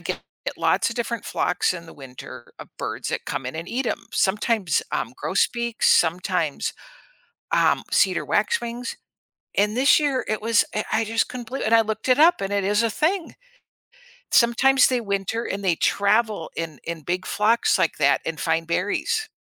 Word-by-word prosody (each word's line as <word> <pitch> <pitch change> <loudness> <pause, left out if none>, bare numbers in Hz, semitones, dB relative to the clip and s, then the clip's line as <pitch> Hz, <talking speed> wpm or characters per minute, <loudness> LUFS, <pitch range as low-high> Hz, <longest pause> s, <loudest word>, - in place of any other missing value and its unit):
get - - -4 0.4
lots - - +2
of 230 - -7
different 235 -1 -3
flocks 180 +1 0
in 170 -2 -8
the - - -12
winter 130 -2 -11
of - - -10
birds - - -4
that - - -3
come 135 - -3
in 130 - -5
and 165 +2 -6
eat 255 +2 -2
'em. - - -1
Sometimes, 200 -3 +1
um, - - -2
grosbeaks, 235 -1 0
sometimes, 170 -2 +1 0.8
um, - - +3
cedar - - +2
waxwings, 245 - -1 0.6
and 210 +2 +2
this 275 +4 +5
year 280 -3 0
it 215 - -1
was, 225 0 +3
uh, 215 - 0
I 225 +1 +2
just 225 +1 0
couldn't 250 -2 -7
believe 270 +3 -4
i - - -1
and 225 - +3
I 225 - +7
looked 220 +2 -4
it 255 +1 +4
up 325 -2 +5
and 195 0 -3
it 200 -1 0
is 205 +3 +2
a 230 - +1
thing. 330 - -1 1.0
Sometimes 255 +3 +5
they 250 -2 0
winter 200 +2 -2
and 200 +1 -4
they 180 -3 +2
travel 205 -1 +1
in 160 -4 -5
in 165 -1 -5
big 180 +4 -3
flocks 230 - +2
like - - +1
that - - +3
and 165 -1 -4
find 165 0 0
berries. 205 - -1
215 Hz, 180 wpm, -23 LUFS, 180-240 Hz, 1.0 s, I